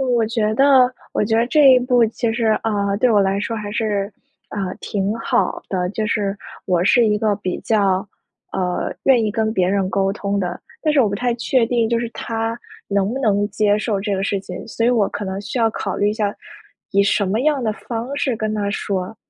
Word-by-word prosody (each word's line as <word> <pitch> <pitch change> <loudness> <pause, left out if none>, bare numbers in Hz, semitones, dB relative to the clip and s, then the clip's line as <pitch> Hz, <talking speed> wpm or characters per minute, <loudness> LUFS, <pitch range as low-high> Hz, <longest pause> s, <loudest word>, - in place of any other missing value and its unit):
我 245 -4 +2
觉 220 -1 0
得 265 -1 +5 0.2
我 - - +1
觉 225 +1 +1
得 230 +1 +2
这 280 -1 +6
一 255 - +6
步 245 -2 +3
其 225 +1 -2
实， 230 -1 -1 0.2
呃， 200 -2 0
对 250 0 +3
我 205 -2 +4
来 195 0 +1
说 225 +2 -3
还 210 -1 -5
是， 205 -2 -1 0.4
呃， 195 -3 -4
挺 200 +1 -2
好 - - 0
的。 180 -2 -1
就 215 0 -2
是 205 -2 -1 0.3
我 175 -1 +1
是 235 +2 +4
一 210 0 +2
个 215 -1 +1
比 185 -3 -3
较， 200 -3 +1 0.5
呃， 180 -1 -2
愿 255 -4 +5
意 210 - 0
跟 220 0 0
别 185 -4 +1
人 195 -1 0
沟 195 0 +1
通 200 -1 -2
的， 180 -2 -3 0.2
但 305 -2 +1
是 280 - +5
我 220 - +3
不 200 - -3
太 245 +1 0
确 240 0 +1
定 235 -2 +1
就 235 -1 +1
是 235 -1 -3
他 225 0 -3 0.3
能 200 +2 0
不 265 - -3
能 205 -3 +1
接 210 -1 +2
受 210 -2 -1
这 205 0 -1
个 190 - -2
事 200 0 0
情， 180 -2 -8
所 230 +1 -1
以 - - +4
我 220 -5 +2
可 205 - -5
能 190 +1 -4
需 215 +5 -4
要 225 -1 +3
考 195 -3 -4
虑 205 - +2
一 - - +1
下 210 -2 -1 0.6
以 200 0 +4
什 200 0 +2
么 215 +5 0
样 290 -2 +1
的 215 -2 0
方 235 +5 -5
式 260 -5 0
跟 215 0 -2
他 200 -1 -1
说。 195 0 -3
215 Hz, 245 characters per minute, -20 LUFS, 200-235 Hz, 0.6 s, 这